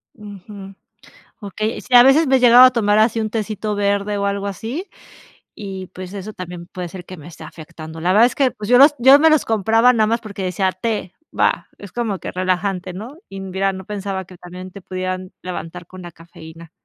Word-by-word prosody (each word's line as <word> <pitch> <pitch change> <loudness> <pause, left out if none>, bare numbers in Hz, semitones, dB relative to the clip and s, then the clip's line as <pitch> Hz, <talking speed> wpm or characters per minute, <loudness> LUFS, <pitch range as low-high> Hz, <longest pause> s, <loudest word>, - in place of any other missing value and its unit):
Ujú, 200 -2 -11 0.7
okey, 215 +2 -4
sí, 250 - -4
a 245 - +10
veces 275 +5 +5
me 265 0 +4
he - - +3
llegado 245 0 +8
a 255 - +8
tomar 210 -4 +1
así 225 +1 +2
un 215 -1 -2
tecito 215 -1 -3
verde 205 0 0
o 200 - -1
algo 200 0 -2
así 225 - -5 0.7
y 195 -2 -7
pues 185 0 -9
eso 205 +1 -7
también 180 -1 -8
puede 180 -1 -6
ser 180 +1 -10
que 185 - -9
me 155 -3 -13
esté 165 - -12
afectando, 160 0 -11
la 175 +3 +1
verdad 220 +4 +6
es 250 - -3
que 270 -2 +2
pues 210 -3 -8
yo 245 - +5
los 285 +3 +7
yo 265 +4 +7
me 320 +2 +5
los 310 -2 +2
compraba 225 +3 +3
nada 220 -2 +2
más 230 +2 0
porque 205 -3 -8
decía: 185 +1 0
"Té, 190 -1 -4 0.2
va, - - +1
es 200 -2 -11
como 225 -5 -2
que - - -6
relajante, 185 0 -2
¿no?", 220 +10 -9
y 195 0 -7
mira, 195 +1 -1
no 190 -1 -9
pensaba 195 -2 -5
que 185 - -14
también 180 +1 -10
te 200 +1 -12
pudieran 185 0 -5
levantar 180 -1 -7
con 185 +1 -12
la 175 -1 -10
cafeína. 165 0 -14
200 Hz, 215 wpm, -19 LUFS, 185-225 Hz, 0.7 s, a